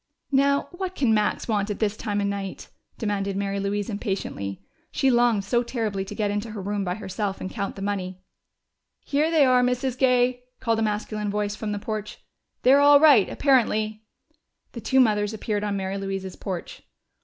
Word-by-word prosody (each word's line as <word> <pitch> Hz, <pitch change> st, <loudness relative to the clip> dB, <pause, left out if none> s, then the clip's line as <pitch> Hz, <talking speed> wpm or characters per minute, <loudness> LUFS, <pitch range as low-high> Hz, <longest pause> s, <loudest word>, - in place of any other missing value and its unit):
"Now 280 Hz, +1 st, +3 dB
what 370 Hz, +1 st, -5 dB
can 245 Hz, -5 st, +2 dB
Max 210 Hz, -1 st, 0 dB
want 210 Hz, -2 st, 0 dB
at 210 Hz, -, -2 dB
this 215 Hz, -1 st, 0 dB
time 205 Hz, -1 st, -2 dB
of -, -, 0 dB
night?" 200 Hz, -1 st, -4 dB, 0.3 s
demanded 200 Hz, -2 st, -2 dB
Mary 200 Hz, 0 st, -2 dB
Louise 200 Hz, +1 st, -2 dB
impatiently. 195 Hz, -, -4 dB, 0.3 s
She 270 Hz, -1 st, +2 dB
longed 240 Hz, -4 st, +3 dB
so 235 Hz, +4 st, +1 dB
terribly 220 Hz, -5 st, -2 dB
to -, -, -8 dB
get 210 Hz, -2 st, 0 dB
into 205 Hz, +2 st, -3 dB
her 215 Hz, -, -6 dB
room 205 Hz, +1 st, -2 dB
by 180 Hz, -1 st, -2 dB
herself 200 Hz, -1 st, -4 dB
and 185 Hz, -, -5 dB
count 200 Hz, -3 st, -4 dB
the 195 Hz, -, -6 dB
money. 190 Hz, -2 st, -3 dB, 0.9 s
"Here 300 Hz, +3 st, +1 dB
they 315 Hz, -4 st, +5 dB
are, 255 Hz, -1 st, +4 dB
Mrs. 250 Hz, 0 st, 0 dB
Gay!" 250 Hz, -1 st, +2 dB, 0.2 s
called 230 Hz, -2 st, 0 dB
a -, -, 0 dB
masculine 210 Hz, 0 st, -2 dB
voice 205 Hz, 0 st, -1 dB
from 215 Hz, -1 st, -4 dB
the 205 Hz, -, -2 dB
porch. 215 Hz, 0 st, -5 dB, 0.5 s
"They're 270 Hz, +3 st, +6 dB
all 285 Hz, 0 st, +8 dB
right, 280 Hz, -10 st, +6 dB
apparently." 220 Hz, -6 st, +1 dB, 0.7 s
The 235 Hz, -, -8 dB
two 265 Hz, +3 st, +2 dB
mothers 210 Hz, -3 st, +2 dB
appeared 210 Hz, -1 st, -2 dB
on 205 Hz, -1 st, -1 dB
Mary 195 Hz, 0 st, -3 dB
Louise's 195 Hz, -1 st, -4 dB
porch. 185 Hz, -3 st, -6 dB
210 Hz, 185 wpm, -25 LUFS, 200-245 Hz, 0.9 s, all